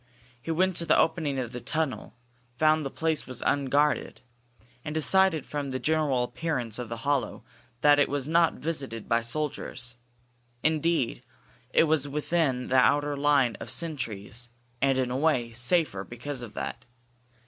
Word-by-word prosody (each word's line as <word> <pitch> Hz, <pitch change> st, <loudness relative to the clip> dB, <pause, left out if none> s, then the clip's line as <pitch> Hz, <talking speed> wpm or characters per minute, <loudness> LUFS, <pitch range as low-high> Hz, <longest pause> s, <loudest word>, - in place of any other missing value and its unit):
He 125 Hz, -, -9 dB
went 185 Hz, +3 st, +2 dB
to 170 Hz, -, +1 dB
the -, -, +5 dB
opening 160 Hz, -4 st, +1 dB
of 125 Hz, -3 st, -3 dB
the 125 Hz, -1 st, -6 dB
tunnel, 155 Hz, -4 st, -3 dB, 0.4 s
found 155 Hz, +1 st, +3 dB
that 135 Hz, -, -3 dB
the -, -, -23 dB
place 160 Hz, -1 st, 0 dB
was 125 Hz, -2 st, -6 dB
unguarded, 145 Hz, +2 st, +1 dB, 0.6 s
and 150 Hz, -, -5 dB
decided 170 Hz, 0 st, +3 dB
from 145 Hz, -2 st, -4 dB
the 130 Hz, -, -2 dB
general 150 Hz, -4 st, +1 dB
appearance 125 Hz, -4 st, -3 dB
of 120 Hz, -3 st, -5 dB
the 115 Hz, -, -4 dB
hollow 140 Hz, -2 st, 0 dB, 0.4 s
that 145 Hz, -1 st, +6 dB
it 145 Hz, -, +3 dB
was 140 Hz, -1 st, -2 dB
not 165 Hz, +1 st, +4 dB
visited 135 Hz, -8 st, -4 dB
by 115 Hz, 0 st, +2 dB
soldiers. 125 Hz, -1 st, -3 dB, 0.7 s
Indeed, 160 Hz, -4 st, +1 dB, 0.5 s
it -, -, +4 dB
was 155 Hz, -3 st, +2 dB
within 145 Hz, -3 st, 0 dB
the 130 Hz, -, +3 dB
outer 145 Hz, +3 st, +3 dB
line 140 Hz, -4 st, +3 dB
of -, -, -7 dB
sentries, 120 Hz, -, -3 dB, 0.3 s
and, 135 Hz, -1 st, +3 dB
in 130 Hz, -1 st, 0 dB
a 125 Hz, -, -1 dB
way, 130 Hz, -6 st, +1 dB
safer 120 Hz, -, +1 dB
because 125 Hz, +4 st, -6 dB
of 115 Hz, -3 st, -9 dB
that. -, -, -5 dB
145 Hz, 160 wpm, -27 LUFS, 125-155 Hz, 0.7 s, that